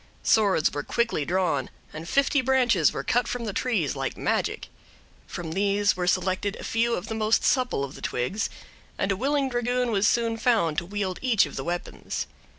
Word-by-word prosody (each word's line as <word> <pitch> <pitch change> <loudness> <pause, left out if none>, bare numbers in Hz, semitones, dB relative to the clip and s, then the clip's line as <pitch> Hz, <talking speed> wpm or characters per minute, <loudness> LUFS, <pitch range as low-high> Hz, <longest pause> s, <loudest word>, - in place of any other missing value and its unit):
Swords 200 -8 +3
were 145 - -2
quickly 230 -4 -1
drawn, 170 -7 0 0.2
and 160 +2 -7
fifty 280 0 +3
branches 245 - +3
were - - -4
cut 240 -1 +1
from 245 -1 -3
the 205 - -3
trees, 200 - 0
like - - -3
magic; - - -1 0.6
from 170 -2 -6
these 200 +3 +2
were 180 -1 -2
selected 185 +2 0
a - - -9
few 230 +1 +1
of 175 - -5
the - - -4
most 220 0 +2
supple 250 - +1
of 140 - -5
the - - -11
twigs, 125 - -2 0.5
and 195 - 0
a - - +1
willing 275 +5 +1
dragoon 245 0 0
was 205 0 +2
soon 230 -1 +1
found 220 -10 +2
to 170 - -9
wield 195 -2 -3
each 240 -8 +3
of 145 - -9
the 135 - -4
weapons. 175 +4 -4
205 Hz, 190 wpm, -26 LUFS, 175-240 Hz, 0.6 s, Swords